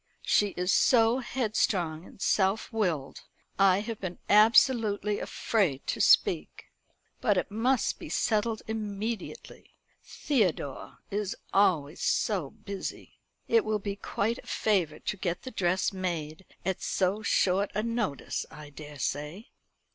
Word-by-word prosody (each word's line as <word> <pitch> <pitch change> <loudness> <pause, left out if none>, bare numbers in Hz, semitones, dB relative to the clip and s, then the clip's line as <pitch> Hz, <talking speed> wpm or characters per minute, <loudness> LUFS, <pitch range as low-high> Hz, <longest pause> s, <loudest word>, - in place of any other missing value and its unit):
She 205 - +3
is 180 +1 +1
so 235 0 +4
headstrong 200 -10 -1
and - - -16
self 195 +4 +1
willed. 170 -11 -1 0.4
I 195 0 +5
have 225 0 -6
been 180 -2 -4
absolutely 210 -1 +4
afraid 180 - -1
to - - -2
speak. - - +3 0.5
But 205 -4 +2
it 180 - -1
must 245 +4 +1
be - - -8
settled 220 0 0
immediately. 220 - -5 0.3
Theodore 185 - -1
is 205 +1 -2 0.2
always 170 -6 +2
so 185 -10 0
busy. 200 +5 -7 0.3
It 455 -2 +4
will 215 -8 0
be 200 -1 -4
quite 220 +3 -2
a - - -15
favour 185 -8 +1
to 210 - -4
get 175 -2 -3
the 260 - -7
dress 185 -2 0
made 175 -2 -4 0.2
at 190 0 -1
so 190 +3 0
short 195 -2 +2
a 210 - 0
notice, 230 - -2
I 150 -1 -11
daresay." 150 - -5
200 Hz, 130 wpm, -29 LUFS, 175-220 Hz, 0.5 s, I